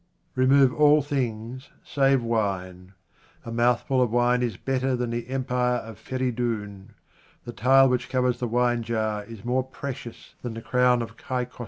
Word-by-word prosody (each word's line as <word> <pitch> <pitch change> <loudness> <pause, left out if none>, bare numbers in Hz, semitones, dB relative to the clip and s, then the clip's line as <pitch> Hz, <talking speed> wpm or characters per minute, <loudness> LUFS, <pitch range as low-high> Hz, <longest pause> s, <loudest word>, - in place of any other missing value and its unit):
Remove 130 0 +4
all 150 0 +5
things 130 -2 -4
save 135 -2 +2
wine. 95 -5 -3 0.5
A 115 - -6
mouthful 120 +2 +1
of 125 - +2
wine 120 +2 +2
is 115 -6 -2
better 130 -1 -1
than 120 -1 -2
the 120 0 -4
empire 125 -1 0
of 115 -3 -7
Feridoun. 115 -5 -3 0.5
The 120 - -7
tile 135 +3 +5
which 125 -1 -1
covers 125 -2 0
the 125 - -2
winejar 115 -3 -1
is 115 -1 -10
more 125 +2 +1
pre 130 +1 -6
cious 120 -2 -12
than 120 -2 -5
the 115 - -6
crown 125 -1 +2
of 115 0 -10
Kai 125 +1 -3
Khosrou. 125 - -22
125 Hz, 165 wpm, -25 LUFS, 115-130 Hz, 0.5 s, all